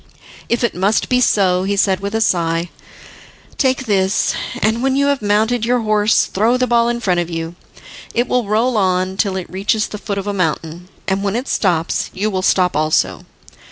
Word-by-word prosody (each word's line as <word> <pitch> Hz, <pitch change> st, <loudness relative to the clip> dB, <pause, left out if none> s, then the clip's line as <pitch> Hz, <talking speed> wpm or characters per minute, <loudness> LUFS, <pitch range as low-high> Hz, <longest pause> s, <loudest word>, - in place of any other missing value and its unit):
"If 235 Hz, +1 st, 0 dB
it 235 Hz, -, +1 dB
must 195 Hz, +5 st, 0 dB
be 250 Hz, 0 st, +2 dB
so," 185 Hz, -6 st, +2 dB
he 200 Hz, +2 st, -1 dB
said, 195 Hz, -1 st, +2 dB
with 200 Hz, +2 st, -4 dB
a 225 Hz, -, 0 dB
sigh, 170 Hz, -4 st, 0 dB, 0.9 s
"take 260 Hz, -1 st, +1 dB
this, 195 Hz, -2 st, +1 dB, 0.3 s
and 220 Hz, +2 st, 0 dB
when 265 Hz, 0 st, +1 dB
you 280 Hz, +1 st, +2 dB
have 280 Hz, -2 st, +1 dB
mounted 215 Hz, +3 st, +1 dB
your 245 Hz, +1 st, +1 dB
horse 215 Hz, 0 st, +2 dB
throw 225 Hz, +6 st, +1 dB
the 255 Hz, -, +1 dB
ball 235 Hz, -1 st, +2 dB
in 240 Hz, 0 st, -2 dB
front 180 Hz, -6 st, 0 dB
of 175 Hz, -1 st, -2 dB
you. 165 Hz, 0 st, -4 dB, 0.6 s
It 240 Hz, +1 st, +1 dB
will 245 Hz, -4 st, 0 dB
roll 225 Hz, +3 st, +1 dB
on 185 Hz, -1 st, 0 dB
till 195 Hz, -1 st, 0 dB
it 185 Hz, -, -4 dB
reaches 200 Hz, +3 st, -1 dB
the 210 Hz, -, -7 dB
foot 200 Hz, -1 st, -4 dB
of 195 Hz, -, -3 dB
a 205 Hz, -, -2 dB
mountain, 170 Hz, -1 st, -3 dB, 0.2 s
and 195 Hz, 0 st, 0 dB
when 200 Hz, +1 st, -1 dB
it 250 Hz, +3 st, -3 dB
stops 170 Hz, -5 st, 0 dB
you 210 Hz, +3 st, -1 dB
will 185 Hz, -1 st, -1 dB
stop 185 Hz, -1 st, +2 dB
also. 150 Hz, -, 0 dB
200 Hz, 200 wpm, -18 LUFS, 185-230 Hz, 0.9 s, be